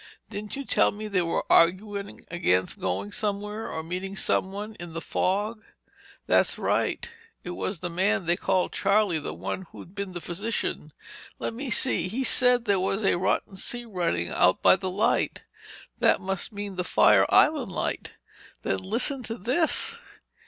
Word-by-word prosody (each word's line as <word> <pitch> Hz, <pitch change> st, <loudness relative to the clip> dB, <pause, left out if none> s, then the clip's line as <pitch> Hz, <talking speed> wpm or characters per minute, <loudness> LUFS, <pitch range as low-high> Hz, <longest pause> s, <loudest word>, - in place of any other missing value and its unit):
"Didn't 210 Hz, 0 st, -6 dB
you 275 Hz, 0 st, -5 dB
tell -, -, +3 dB
me 215 Hz, +1 st, -6 dB
they 195 Hz, -3 st, +1 dB
were 165 Hz, -1 st, -1 dB
arguing 200 Hz, +4 st, +2 dB
against 95 Hz, -, +1 dB
going 95 Hz, +3 st, -2 dB
somewhere—or 210 Hz, -4 st, -3 dB
meeting 185 Hz, +4 st, -5 dB
someone—in 195 Hz, -3 st, -2 dB
the 165 Hz, -, -3 dB
fog?" 205 Hz, +6 st, -1 dB, 0.6 s
"That's -, -, +3 dB
right. -, -, 0 dB, 0.4 s
It 180 Hz, -, -6 dB
was 190 Hz, +2 st, -3 dB
the 175 Hz, +2 st, -5 dB
man 190 Hz, +2 st, +1 dB
they 170 Hz, +1 st, +2 dB
called 185 Hz, 0 st, 0 dB
Charlie—the 195 Hz, -, +1 dB
one 95 Hz, -, -5 dB
who'd 175 Hz, -, -12 dB
been 200 Hz, -3 st, -5 dB
a -, -, -4 dB
physician. 200 Hz, +7 st, -3 dB, 0.5 s
Let -, -, -4 dB
me 260 Hz, +3 st, -5 dB
see... 200 Hz, -7 st, +3 dB
he 235 Hz, +8 st, -2 dB
said 250 Hz, -1 st, +5 dB
that -, -, -22 dB
there 200 Hz, -3 st, +2 dB
was 195 Hz, +3 st, -1 dB
a 195 Hz, -, +3 dB
rotten 190 Hz, +1 st, -1 dB
sea 240 Hz, +5 st, -2 dB
running 170 Hz, -, -1 dB
out 90 Hz, -, +2 dB
by -, -, +7 dB
the 190 Hz, 0 st, -4 dB
light. 210 Hz, +6 st, 0 dB, 0.6 s
That -, -, +4 dB
must 190 Hz, -1 st, -3 dB
mean 205 Hz, -2 st, -6 dB
the 180 Hz, -, 0 dB
Fire -, -, +4 dB
Island 295 Hz, -9 st, +3 dB
Light! -, -, -3 dB, 0.5 s
Then, 95 Hz, -, 0 dB
listen 250 Hz, -, +2 dB
to 225 Hz, -1 st, -5 dB
this. 315 Hz, -, +1 dB
195 Hz, 160 wpm, -26 LUFS, 175-215 Hz, 0.6 s, by